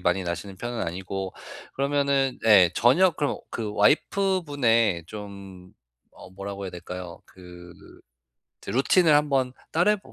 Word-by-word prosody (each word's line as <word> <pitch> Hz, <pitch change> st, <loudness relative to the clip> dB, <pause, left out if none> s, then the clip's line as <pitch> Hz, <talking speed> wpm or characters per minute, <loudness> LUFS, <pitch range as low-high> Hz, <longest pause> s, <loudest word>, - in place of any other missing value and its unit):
많이 90 Hz, +1 st, 0 dB
나시는 90 Hz, +3 st, -5 dB
편은 120 Hz, +4 st, -5 dB
아니고. 95 Hz, +2 st, -5 dB, 0.4 s
그러면은 140 Hz, -1 st, 0 dB
예 95 Hz, -5 st, +7 dB
저녁 165 Hz, +8 st, +4 dB
그럼 145 Hz, -2 st, -1 dB
그 110 Hz, -2 st, -4 dB
와이프 190 Hz, -, +2 dB
분의 115 Hz, -, +1 dB
좀 100 Hz, -3 st, -10 dB, 0.5 s
어 -, -, -12 dB
뭐라고 100 Hz, +1 st, -7 dB
해야 95 Hz, -, -5 dB
될까요. 90 Hz, 0 st, -8 dB
그 90 Hz, -1 st, -14 dB, 0.9 s
드 -, -, -6 dB
루틴을 155 Hz, +6 st, +3 dB
한번 140 Hz, -4 st, +2 dB, 0.2 s
따라해 180 Hz, +6 st, +3 dB
보 195 Hz, -, -18 dB
105 Hz, 275 characters per minute, -25 LUFS, 95-140 Hz, 0.9 s, 예